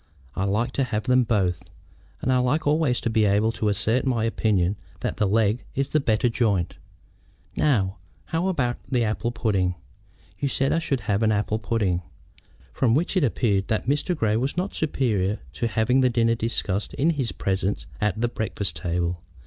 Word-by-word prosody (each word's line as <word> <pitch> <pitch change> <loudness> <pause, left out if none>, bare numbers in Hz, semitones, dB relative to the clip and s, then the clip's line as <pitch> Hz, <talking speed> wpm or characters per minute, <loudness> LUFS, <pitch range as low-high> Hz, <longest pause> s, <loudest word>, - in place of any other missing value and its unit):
I 95 - 0
like 110 +5 0
to 135 - 0
have 110 -4 -2
them 125 +2 +4
both, 95 -7 0 0.6
and 130 - +2
I 125 - +3
like 140 +6 +1
always 145 -4 +2
to - - -1
be 110 -1 +3
able 105 +3 +3
to 110 -2 -1
assert 105 +5 +2
my 120 -4 0
opinion 105 -4 +1 0.3
that - - -2
the 105 - +2
leg 110 +3 +2
is 135 0 0
the 155 - +2
better 115 -3 +2
joint. 110 -7 0 0.8
Now, 100 -11 +1 0.3
how 165 +3 -1
about 130 -10 0
the 125 -2 +2
apple 110 +2 -1
pudding? 100 -6 0 0.6
You 140 - 0
said 135 0 +1
I 165 - +2
should 140 -6 -1
have 105 0 0
an 110 -1 +3
apple 105 +1 0
pudding." 100 -4 0 0.7
From 120 -3 +2
which 170 +7 0
it 185 - +3
appeared 105 -6 +1
that 110 - -1
Mr. 150 +6 0
Grey 110 -4 +1
was 135 +7 -2
not 185 +3 -1
superior 110 -10 0 0.2
to 95 +11 -1
having 115 +4 +2
the 130 - +4
dinner 115 -1 +2
discussed 110 -3 -2
in 160 +5 +2
his 135 -7 -1
presence 95 +1 -1 0.2
at 105 0 0
the 120 - +2
breakfast 110 -4 -3
table. 85 -1 -2
115 Hz, 185 wpm, -24 LUFS, 100-130 Hz, 0.8 s, them